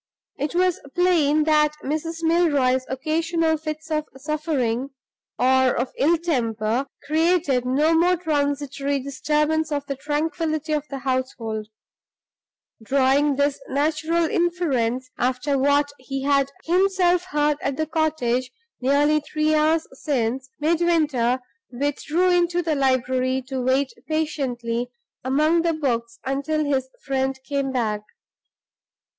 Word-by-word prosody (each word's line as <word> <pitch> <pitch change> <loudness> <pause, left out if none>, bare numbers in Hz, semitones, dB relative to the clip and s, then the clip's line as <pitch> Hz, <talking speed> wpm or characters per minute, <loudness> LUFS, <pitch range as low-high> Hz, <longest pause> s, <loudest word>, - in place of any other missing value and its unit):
It 295 +4 -2
was 365 -1 +2 0.2
plain 320 -4 +3
that 300 -1 +3
Mrs. 325 +3 -3
Milroy's 285 -7 +2
occasional 320 +4 0
fits 310 0 -6
of 305 -1 0
suffering 275 -4 -1 0.5
(or 260 0 +3
of 245 +1 -2
ill 330 +5 +3
temper) 240 -6 -1 0.2
created 310 -4 +2
no 295 +6 +3
mere 350 +2 +3
transitory 285 -3 -1
disturbance 300 +4 0
of 285 -1 -2
the 275 - -3
tranquillity 310 +2 -2
of 300 -1 -1
the 275 - -4
household. 255 -5 -3 1.2
Drawing 275 +3 +3
this 285 0 +1
natural 315 +4 +1
inference, 265 -9 0
after 255 +3 0
what 285 +1 +2
he 270 +1 -5
had 275 -1 +2
himself 360 0 +2
heard 295 -4 +1
at 275 -1 -2
the 315 - 0
cottage 300 -6 0 0.3
nearly 290 +4 +3
three 305 +1 0
hours 310 +1 +2
since, 260 -2 -2
Midwinter 305 -6 +2 0.3
withdrew 290 +7 0
into 350 0 +2
the 320 -1 0
library 260 -1 +1
to 265 -1 -2
wait 260 +2 +1
patiently 250 -7 -2 0.3
among 305 +6 +2
the 335 0 +1
books 235 -6 -2
until 280 +3 -1
his 265 -2 0 0.2
friend 265 0 -1
came 275 -2 -1
back. 220 -5 -1
285 Hz, 120 wpm, -23 LUFS, 260-315 Hz, 1.2 s, plain